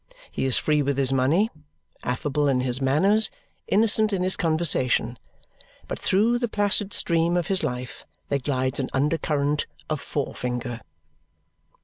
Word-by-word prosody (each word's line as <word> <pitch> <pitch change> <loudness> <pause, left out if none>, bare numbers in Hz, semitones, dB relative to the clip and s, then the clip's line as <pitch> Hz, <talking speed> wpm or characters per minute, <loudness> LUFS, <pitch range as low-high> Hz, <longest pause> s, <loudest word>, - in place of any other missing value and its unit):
He - - -2
is 130 - +3
free 150 -1 +1
with 140 -1 -1
his 135 -1 +2
money, 155 - +2 0.5
affable 145 +3 -1
in 130 -2 +2
his 125 +1 -1
manners, 195 +12 +3 0.4
innocent 215 +1 +2
in 190 -2 0
his 185 0 +2
conversation 140 -8 +1 0.7
but - - -5
through 225 +5 +2
the 240 - 0
placid 205 -1 0
stream 170 -1 +2
of 175 -1 -2
his 190 -1 +3
life 125 -4 -5 0.2
there 140 - +1
glides 130 0 -1
an 130 - -2
under 150 +4 +1
current 145 0 0 0.2
of 150 -2 -1
forefinger. 125 -4 -4
150 Hz, 145 wpm, -24 LUFS, 130-185 Hz, 0.7 s, is